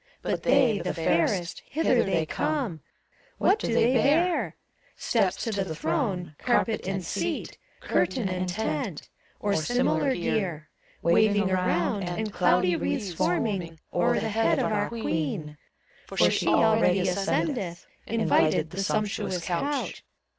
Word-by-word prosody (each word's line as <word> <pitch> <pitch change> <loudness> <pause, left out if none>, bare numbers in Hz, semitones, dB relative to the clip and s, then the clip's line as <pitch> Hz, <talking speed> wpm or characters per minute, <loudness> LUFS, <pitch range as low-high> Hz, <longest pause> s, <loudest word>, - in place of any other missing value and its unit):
But - - -1
they, 250 -5 +3
the - - -3
fairest, 170 +2 0
Hither 275 -5 +2
they 175 -5 0
come: 245 - -2 0.6
What 405 +3 +3
do - - -2
they 235 +2 +3
bear? 310 +8 +2 0.4
Steps - - 0
to 230 - -2
the 195 -6 -2
throne 180 - -2
Carpet 230 -4 0
and 190 -2 -2
seat, 170 0 -3 0.2
Curtain 185 +4 0
and 185 0 -2
tent. 175 -4 -3 0.3
Or 205 -1 0
similar 245 - +1
gear; 170 -5 -2 0.3
Waving 205 +2 +3
around, 185 +2 0
and 205 +4 -3
Cloudy 180 0 +3
wreaths 170 - -2
forming 175 -1 -1
O'er 175 - +2
the 220 +1 -2
head 225 +1 +2
of - - 0
our 205 -1 0
Queen; 160 -8 -3 0.5
For - - -9
she - - 0
already 220 -4 +4
ascendeth. 190 - -1 0.2
Invited, 160 -8 +2
the 195 - -3
sumptuous 205 -3 -1
couch. 275 +12 -2
195 Hz, 130 wpm, -26 LUFS, 175-225 Hz, 0.6 s, already